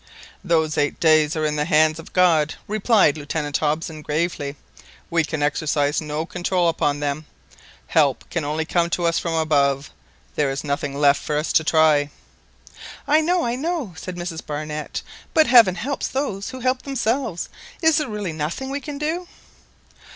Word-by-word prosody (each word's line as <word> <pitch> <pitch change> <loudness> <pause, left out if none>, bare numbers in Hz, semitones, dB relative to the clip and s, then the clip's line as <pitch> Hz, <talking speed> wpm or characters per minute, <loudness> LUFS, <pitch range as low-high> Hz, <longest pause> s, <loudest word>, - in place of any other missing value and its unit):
"Those 160 -4 +1
eight 145 0 0
days 155 -1 +4
are 155 -1 0
in 150 0 -1
the 150 - 0
hands 155 0 +3
of 165 - -11
God," 165 -4 +3
replied 210 -7 +3
Lieutenant 145 0 -2
Hobson 155 +1 -2
gravely; 150 -1 -2 0.6
"we 165 -1 +3
can 155 -1 -3
exercise 145 0 +1
no 155 +1 -3
control 180 0 0
upon 145 -3 0
them. 145 +1 -3 0.6
Help 140 -6 +1
can 170 - -1
only 155 +2 -2
come 170 +1 +1
to 170 0 -1
us 165 0 +2
from 165 -1 -2
above; 140 -3 +1 0.4
there 145 -2 +1
is 135 0 -3
nothing 140 -1 -2
left 145 -1 +4
for 150 - -2
us 150 - -1
to 160 - +4
try." 155 -2 +3 1.0
"I 305 +2 +4
know, 350 +2 +1
I 235 - 0
know!" 290 - -3
said 180 +3 -7
Mrs 175 -2 -5
Barnett; 150 0 -5 0.3
"but 315 -1 +6
Heaven 230 -8 +6
helps 275 +8 -3
those 240 -8 -3
who 260 -1 -8
help 255 +1 +1
themselves. 255 -7 -2 0.4
Is 320 -2 +5
there 300 -4 -1
really 205 -5 -4
nothing 160 - -4
we 280 +1 -3
can 285 +1 -6
do?" 325 +5 -2
160 Hz, 170 wpm, -22 LUFS, 150-210 Hz, 1.0 s, but